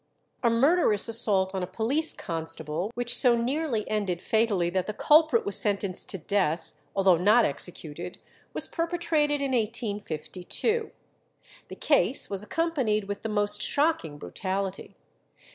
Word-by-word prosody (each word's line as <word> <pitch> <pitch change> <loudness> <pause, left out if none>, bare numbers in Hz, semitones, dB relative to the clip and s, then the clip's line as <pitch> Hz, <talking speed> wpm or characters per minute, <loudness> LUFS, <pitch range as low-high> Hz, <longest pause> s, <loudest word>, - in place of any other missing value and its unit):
A 235 - +3
murderous 235 - +2
assault 205 -5 +2
on 190 - -2
a 180 - -3
police 275 - -1
constable, 160 +1 -3
which 245 0 0
so 245 -3 +4
nearly 250 -2 -1
ended 200 -5 -2
fatally 200 -4 +1
that 185 0 -1
the 215 - -4
culprit 305 -5 +4
was 200 - +5
sentenced 200 -3 0
to - - -2
death, 180 -2 -1 0.2
although 190 -3 +4
not 210 +7 +4
executed, 170 +3 -5 0.3
was - - -1
perpetrated 325 -4 -1
in 275 - -1
1852. 215 - -2 0.8
The - - -9
case - - +1
was 195 -1 -3
accompanied 255 -4 -1
with 200 0 -6
the 225 - -4
most 205 0 0
shocking 285 - 0
brutality. 190 - -5
210 Hz, 135 wpm, -27 LUFS, 185-250 Hz, 0.8 s, was